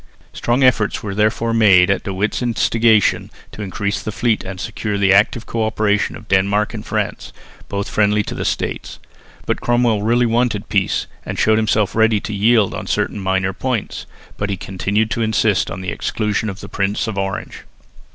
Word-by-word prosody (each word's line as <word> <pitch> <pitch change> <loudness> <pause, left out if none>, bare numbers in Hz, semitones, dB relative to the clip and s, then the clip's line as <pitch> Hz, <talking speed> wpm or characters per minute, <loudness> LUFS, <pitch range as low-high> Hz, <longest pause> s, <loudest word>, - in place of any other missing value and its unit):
Strong 120 +3 0
efforts 115 -5 +2
were 105 -2 -4
therefore 110 +3 +1
made 100 -4 +5
at 100 - 0
De 100 - -5
Witt's 100 +5 -1
instigation 115 -2 +2 0.2
to - - -9
increase 100 0 -3
the 110 - -4
fleet 115 0 0
and 95 0 -7
secure 105 0 -3
the 100 -1 +4
active 105 +4 +3
co 115 -1 -2
operation 110 -1 0
of 105 - -12
Denmark 100 +2 +1
and - - -6
France, - - -3 0.4
both 100 0 -3
friendly 105 0 +2
to - - -6
the - - -4
States. - - -3 0.5
But - - -1
Cromwell 120 -3 +2
really 120 +3 +2
wanted 115 -3 0
peace 100 -2 0 0.2
and - - -5
showed 110 0 +3
himself 110 -2 +1
ready 110 -1 +3
to 105 - -6
yield 105 0 +3
on - - -6
certain - - -1
minor 95 0 0
points, 125 +1 -3 0.3
but 100 - -2
he 100 - -2
continued 100 +4 -1
to 125 -3 -1
insist 110 -3 +1
on 95 - -6
the 90 -2 -3
exclusion 105 +3 -2
of 100 +1 -8
the 100 - -8
Prince 100 +1 -1
of 110 -3 -4
Orange. 95 0 -4
105 Hz, 185 wpm, -19 LUFS, 100-110 Hz, 0.5 s, made